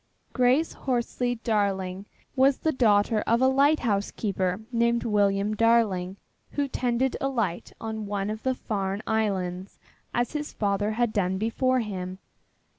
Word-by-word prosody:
Grace 255 +5 +3
Horsley 245 -1 -1
Darling 200 -4 -1 0.3
was 270 0 +4
the 315 - 0
daughter 215 -4 +3
of 230 +1 +3
a 260 - +4
lighthouse 265 -7 +2
keeper 190 -2 -2
named 235 0 +2
William 205 -1 +1
Darling, 210 -5 +2 0.4
who 285 -1 0
tended 250 0 0
a 275 - +1
light 215 -10 -2
on 220 -1 -5
one 200 0 -2
of 215 +1 -5
the 260 0 0
Farne 200 -3 -3
Islands 190 -4 -2 0.3
as 240 0 0
his 300 -1 -4
father 205 +1 0
had 235 -1 0
done 190 -2 0
before 255 +4 +1
him. 185 -4 -5
220 Hz, 140 wpm, -26 LUFS, 200-245 Hz, 0.4 s, was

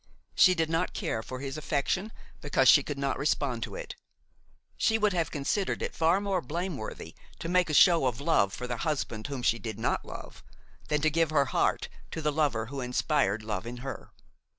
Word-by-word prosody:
She 185 -1 +6
did 165 -2 +1
not 165 +3 -1
care 110 - -2
for 130 +3 -7
his 140 +2 -4
affection 160 +8 -1 0.3
because - - +2
she - - +8
could - - -5
not - - -1
respond - - 0
to - - -5
it. - - -7 0.8
She 225 - +2
would 210 -2 +2
have 170 -2 0
considered 155 +7 -1
it - - -3
far 165 +4 +3
more 200 -3 -1
blameworthy 150 - -5 0.2
to - - -6
make 180 -1 +2
a - - -1
show 170 -6 +6
of 120 -3 -2
love 140 -10 +2
for 125 - -5
the 120 -1 -3
husband 125 -7 -2
whom 135 -4 -5
she 115 - +2
did 110 -3 -5
not 110 - -1
love, - - -10 0.5
than 150 -1 0
to 155 +1 +2
give 165 0 +2
her 145 -3 +3
heart 120 - 0 0.2
to - - -5
the 150 - +2
lover 140 -7 0
who 135 +3 -6
inspired 125 -4 0
love 110 0 -4
in 120 +1 -6
her. 135 - -6
150 Hz, 200 wpm, -29 LUFS, 125-170 Hz, 0.8 s, she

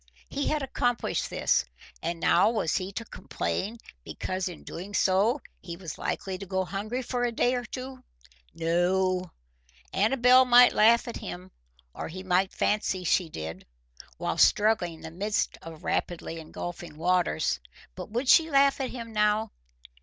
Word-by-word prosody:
He 285 0 -2
had 300 -2 0
accomplished 245 -2 -1
this, - - +2 0.4
and 170 0 -3
now 175 - +4
was 220 -8 0
he 185 0 -4
to 230 - -5
complain 220 -1 -4 0.3
because 185 - -3
in 175 - -10
doing 195 +4 -7
so 205 +10 +2 0.2
he 170 -2 -7
was 170 -4 -8
likely 190 -1 -3
to 195 - -8
go 190 0 -1
hungry 215 +7 -4
for 245 0 -2
a 240 - +1
day 245 +2 +1
or 245 -1 -2
two? 255 +2 -7 0.5
No; 180 +2 +1 0.6
Amabel 250 +2 +5
might 245 0 +7
laugh 230 +3 +5
at 235 - -5
him, 90 +1 -8 0.4
or - - -5
he 185 +3 -8
might 185 +1 +2
fancy 195 -3 0
she 175 0 +2
did, 80 - -7 0.5
while - - -2
struggling 210 -5 +3
in - - -16
the 160 - -8
midst 205 +5 -1
of 160 -1 -10
rapidly 165 -1 -2
engulfing 170 0 -7
waters, 175 - +1 0.3
but - - -8
would 240 +5 -2
she 325 +4 +6
laugh 275 -1 +4
at 260 - -2
him 230 -3 -7
now? 210 +1 +2
195 Hz, 160 wpm, -27 LUFS, 175-240 Hz, 0.6 s, might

